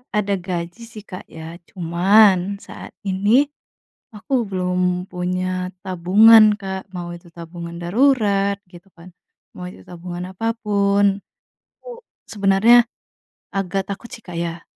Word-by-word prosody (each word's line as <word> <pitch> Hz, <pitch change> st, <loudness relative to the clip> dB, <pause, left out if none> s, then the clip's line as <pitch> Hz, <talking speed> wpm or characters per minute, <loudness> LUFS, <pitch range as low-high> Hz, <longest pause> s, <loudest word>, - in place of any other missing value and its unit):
ada 205 Hz, -1 st, 0 dB
gaji 175 Hz, +3 st, -5 dB
sih 215 Hz, -3 st, -11 dB
Kak 185 Hz, -3 st, -10 dB
ya, 165 Hz, +1 st, -9 dB
cuman 190 Hz, +2 st, +3 dB
saat -, -, -11 dB
ini 205 Hz, +8 st, +3 dB, 0.7 s
aku 270 Hz, +7 st, -7 dB, 0.2 s
belum 180 Hz, -1 st, -1 dB
punya 180 Hz, +1 st, -3 dB
tabungan 210 Hz, +4 st, +6 dB
Kak, 190 Hz, 0 st, -6 dB
mau 175 Hz, -1 st, -5 dB
itu 175 Hz, -, -15 dB
tabungan 170 Hz, 0 st, -8 dB
darurat 200 Hz, -2 st, +2 dB
gitu 175 Hz, +1 st, -15 dB
kan, 175 Hz, +2 st, -14 dB, 0.4 s
mau 180 Hz, -, -7 dB
itu -, -, -15 dB
tabungan 180 Hz, +1 st, -7 dB
apa 225 Hz, +4 st, -2 dB
pun. 200 Hz, -1 st, +2 dB, 0.6 s
Aku -, -, -11 dB, 0.3 s
sebenarnya 215 Hz, +4 st, +4 dB, 0.7 s
agak 195 Hz, 0 st, -1 dB
takut 215 Hz, +4 st, -7 dB
sih 225 Hz, -, -12 dB
Kak 175 Hz, -, -8 dB
ya, 170 Hz, 0 st, -4 dB
190 Hz, 125 wpm, -20 LUFS, 180-205 Hz, 0.7 s, tabungan